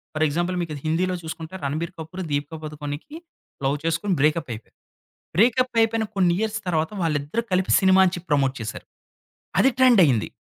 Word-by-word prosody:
For 155 - +1
example 175 +5 -1
మీకు 165 -3 -4
హిందీలో 180 +4 0
చూసుకుంటే 160 +1 -7
'రణబీర్ 155 +5 -2
కపూర్', 180 +4 -6
'దీపికా 145 +3 -2
పదుకోనెకి' 150 - -6 0.5
లవ్ 140 +2 +1
చేసుకొని 165 +4 0
బ్రేకప్ 150 -2 +1
అయిపోయారు. 110 0 -12 0.6
బ్రేకప్ 250 +5 +3
అయిపోయిన 225 0 +1
కొన్ని 180 -3 +3
ఇయర్స్ 220 0 -1
తర్వాత 160 0 0
వాళ్ళిద్దరూ 155 +7 -1
కలిపి 185 0 +1
సినిమా 190 0 +5
అని 180 - +1
చెప్పి 175 +1 -9
ప్రమోట్ 135 -2 +2
చేసారు 110 - -6 0.7
అది 265 - +6
ట్రెండ్ 250 -5 +6
అయింది. 120 -6 +1
165 Hz, 160 wpm, -23 LUFS, 150-190 Hz, 0.7 s, అది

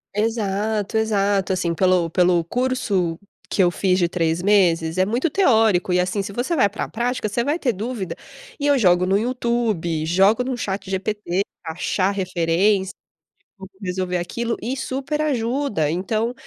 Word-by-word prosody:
Exato, 215 -1 -1
exato. 200 -3 +1
Assim, 175 -2 -1
pelo 180 -2 +2
pelo 175 0 +3
curso 200 -8 -1 0.3
que 190 - +2
eu 175 - +4
fiz 185 0 +1
de 175 - +2
3 165 -1 -1
meses, 175 -4 +2
é 185 - +3
muito 245 - 0
teórico. 220 - +3
E 180 - +3
assim, 185 +3 0
se 200 - -6
você 250 - -1
vai 230 -8 +4
pra 210 - -4
prática, 240 0 -2
você 235 +3 -1
vai 295 +6 -1
ter 250 -7 0
dúvida. 215 -2 -4 0.4
E 290 - 0
eu 285 - +4
jogo 180 -6 +4
no 195 +2 +2
YouTube, 225 -9 -1
jogo 195 +8 +3
no 255 0 -2
ChatGPT, 195 -2 -2 0.2
achar 185 +4 -1
referência, 190 +1 +1 0.7
tipo, 190 -1 -11
resolver 180 -1 -2
aquilo 230 +7 -3
e 245 +5 -2
super 275 +3 -3
ajuda. 245 - 0
Então 215 +8 -1
200 Hz, 155 wpm, -22 LUFS, 180-235 Hz, 0.7 s, eu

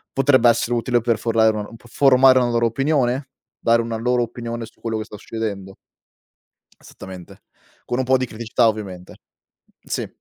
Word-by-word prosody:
potrebbe 130 -3 +4
essere 120 +1 +1
utile 120 0 0
per 115 -2 +1
formale 110 -1 +2
una 105 - -5
per 115 +1 -15
formare 130 0 +5
una 125 - +1
loro 115 0 +2
opinione, 135 +1 0 0.3
dare 115 0 +3
una 115 -1 -4
loro 125 +1 +1
opinione 115 0 -6
su - - -19
quello 110 -1 -3
che 110 - -3
sta 105 - -11
succedendo. 100 -3 -6 1.1
Esattamente, 95 -2 -12 0.4
con 120 - -2
un - - +1
po' 130 +1 +3
di 130 - -2
criticità 115 0 0
ovviamente. 95 -5 -5 0.7
Sì. - - -4
115 Hz, 165 wpm, -21 LUFS, 110-125 Hz, 1.1 s, formare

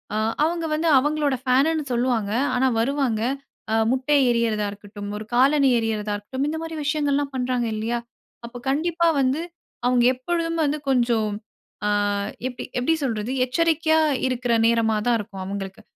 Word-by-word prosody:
அ - - 0 0.3
அவுங்க 335 0 -1
வந்து 320 +2 0
அவுங்களோடய 285 -2 0
ஃபேனுன்னு 280 +5 +2
சொல்லுவாங்க. 235 -4 0 0.2
ஆனா 260 +1 +3
வருவாங்க. 250 -3 0 0.5
ஆ - - +2 0.2
முட்டைய 270 +2 +2
எரியரதா 225 -3 +1
இருக்கட்டும், 205 0 -9
ஒரு 215 - -7
காலணி 275 +2 +4
எரியரதா 215 -2 -2
இருக்கட்டும், 260 +7 -3
இந்த 320 - -3
மாரி 325 0 -6
விஷயங்கள் 290 -1 +1
எல்லாம் 280 -1 -2
பண்றாங்க 250 -1 0
இல்லையா, 230 +2 -2 0.5
அப்ப 245 - -10
கண்டிப்பா 335 +3 +1
வந்து 265 +4 +1 0.4
அவுங்க 245 -1 +3
எப்பொழுதும் 330 +4 -2
வந்து 295 +1 0
கொஞ்சம், 235 -4 +2 0.6
ஆ - - +2 0.6
எப் 250 - -13 0.2
எப்படி 320 +7 +2
சொல்றது 230 -2 -2
எச்சரிக்கையா 320 +3 +2 0.3
இருக்குற 250 -1 -1
நேரமா 225 -2 +2
தான் 240 -1 +4
இருக்கும் 200 -2 -7
அவுங்களுக்கு. 195 +1 -6
255 Hz, 145 wpm, -23 LUFS, 225-295 Hz, 0.6 s, காலணி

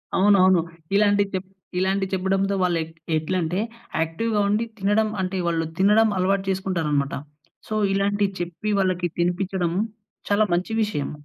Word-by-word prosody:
అవునవును. 190 -3 +5 0.3
ఇలాంటి 205 0 +4
చెప్ 185 0 -3 0.3
ఇలాంటి 195 +1 +1
చెప్పడంతో 195 +1 +1
వాళ్ళు 180 -2 +2
ఎట్ 160 +1 -12 0.2
ఎట్లంటే 170 +2 -1 0.4
యాక్టివ్‌గా 205 +7 0
ఉండి, 215 +3 +1
తినడం 210 +2 +2
అంటే 185 +1 -2
వాళ్ళు 165 -1 0
తినడం 210 +3 +5
అలవాటు 190 +1 +1
చేసుకుంటారనమాట. 165 -7 0 0.5
సో, 215 - -4 0.2
ఇలాంటి 200 +1 +1
చెప్పి 175 +4 -4
వాళ్ళకి 185 -2 +1
తినిపిచ్చడం 180 0 0 0.6
చాలా 205 +1 +4
మంచి 180 +5 -1
విషయం. 150 -10 -2
190 Hz, 130 wpm, -23 LUFS, 175-200 Hz, 0.6 s, అవునవును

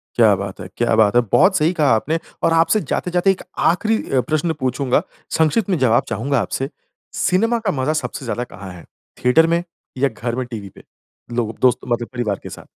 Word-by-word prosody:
क्या 110 -4 +5
बात 95 0 -6
है! 90 - -7
क्या 120 -2 +2
बात 110 0 +4
है! 120 - +6
बहुत 190 +4 +5
सही 160 +3 +2
कहा 150 -4 +1
आपने 160 +9 -1 0.2
और 165 - +3
आपसे 165 +6 +3
जाते-जाते 180 +2 +2
एक 190 - -4 0.3
आखिरी 220 +5 0
अ, 130 -2 +3
प्रश्न 155 +5 -1
पूछूँगा। 130 +2 +1 0.4
संक्षिप्त 160 +7 +2
में 180 - +2
जवाब 120 -3 +3
चाहूँगा 125 +4 0
आपसे। 135 +7 -2 0.4
सिनेमा 225 +6 +1
का 210 -4 -1
मज़ा 150 +4 +1
सबसे 135 - -6
ज़्यादा 120 +1 -2
कहाँ 100 -6 -10
है? 85 - -12 0.4
थिएटर 160 +7 +5
में, 170 +1 +1 0.3
या 140 +1 +2
घर 115 +1 -4
में 130 -1 -2
टीवी 110 -5 -7
पे, - - -17 0.5
लोग 115 -2 -2
दोस्त 125 -1 +4
मतलब 120 -1 -1
परिवार 110 -5 -2
के - - -7
साथ? - - -11
130 Hz, 200 wpm, -20 LUFS, 115-165 Hz, 0.5 s, है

